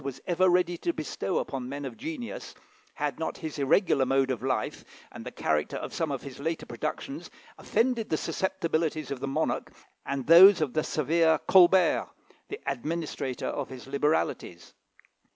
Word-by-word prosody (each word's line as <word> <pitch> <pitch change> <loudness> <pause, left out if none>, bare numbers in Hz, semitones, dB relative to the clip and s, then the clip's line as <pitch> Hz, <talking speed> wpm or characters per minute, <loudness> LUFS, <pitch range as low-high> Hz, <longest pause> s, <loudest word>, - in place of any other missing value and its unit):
was 135 -2 -5
ever 185 +1 +3
ready 175 -1 +2
to 170 - 0
bestow 155 -11 -3
upon 130 -2 -3
men 140 +1 -5
of 130 - -6
genius, 275 -2 -7 0.4
had - - -3
not - - -3
his 155 -3 -6
irregular 140 0 +3
mode 135 0 +2
of 125 - -3
life, 130 -4 -2 0.3
and - - -9
the - - -7
character 75 -1 -1
of - - -6
some 165 - -1
of 135 - -4
his 135 -2 -9
later 160 +3 -3
productions, - - -5 0.3
offended 235 -2 0
the 155 - +1
susceptibilities 160 -6 -2
of 140 - -3
the 140 - -4
monarch 135 - -1 0.3
and 140 -2 -3
those 180 +4 +9
of 150 -5 -1
the 155 - +1
severe 160 +2 +2
Colbert, 185 0 +5 0.4
the 420 - -6
administrator 155 - -3
of 145 - -3
his 130 -2 -9
liberalities. 140 - -1
155 Hz, 165 wpm, -28 LUFS, 135-175 Hz, 0.4 s, those